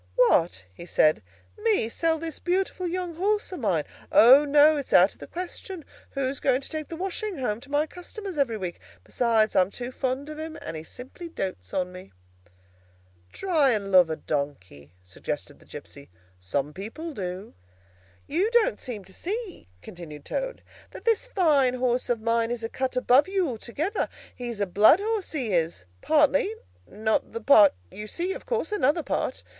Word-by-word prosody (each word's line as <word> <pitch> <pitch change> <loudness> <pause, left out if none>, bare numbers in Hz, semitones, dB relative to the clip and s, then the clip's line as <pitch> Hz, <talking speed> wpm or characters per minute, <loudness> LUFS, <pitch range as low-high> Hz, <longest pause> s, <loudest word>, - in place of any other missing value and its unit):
"What?" 175 - +3
he 170 - -11
said, 155 -8 +3 0.4
"me 425 - +2
sell 325 +7 0
this 325 -1 -6
beautiful 365 0 -1
young 355 0 -3
horse 415 +3 0
of 365 - -6
mine? 185 - +1 0.3
O, 265 +6 +8
no; 295 +2 +6
it's 280 - -4
out 185 +3 +6
of - - -24
the - - -9
question. 360 -1 -7 0.3
Who's 270 0 -2
going 265 0 +2
to - - -8
take 310 -2 -4
the 330 - -6
washing 385 +3 -3
home 230 -4 -2
to 280 - -14
my 290 +2 +2
customers 365 +3 -8
every 265 -6 0
week? 180 -4 -5 0.2
Besides, 225 -3 +1
I'm 185 0 +4
too 245 +4 -6
fond 260 +2 -2
of 305 0 -7
him, 320 0 -6
and - - -6
he 155 - -5
simply 255 - -10
dotes 140 - -5
on 180 -1 -1
me." 180 - -12 1.2
"Try 310 -9 +2
and 200 -2 -2
love 180 -3 +6
a 160 - -1
donkey," 110 - -5
suggested 90 +1 -6
the - - -21
gipsy. 140 0 -11 0.3
"Some 135 +11 -2
people 230 - -7
do." 185 -2 -6 0.7
"You 360 +9 +1
don't 475 +1 +2
seem 220 -7 -6
to 190 - -13
see," 405 - -5 0.2
continued 155 -5 -10
Toad, - - -4 0.3
"that - - -12
this 455 +1 +2
fine 295 - +3
horse 250 0 0
of 235 -2 0
mine 230 0 +1
is 240 -1 -3
a 225 - -2
cut 260 0 -2
above 255 +4 +4
you 380 -2 0
altogether. 275 - -3 0.3
He's 240 -3 -6
a 200 - +2
blood 205 - +6
horse, 425 -3 -2
he 250 -9 -2
is, 165 - 0 0.2
partly; 285 -7 +3 0.3
not 220 +2 -1
the 230 - -4
part 215 - +7 0.2
you 210 +1 -7
see, 355 - -2
of - - -10
course—another 415 - +1
part. - - -2
260 Hz, 175 wpm, -26 LUFS, -, 1.2 s, O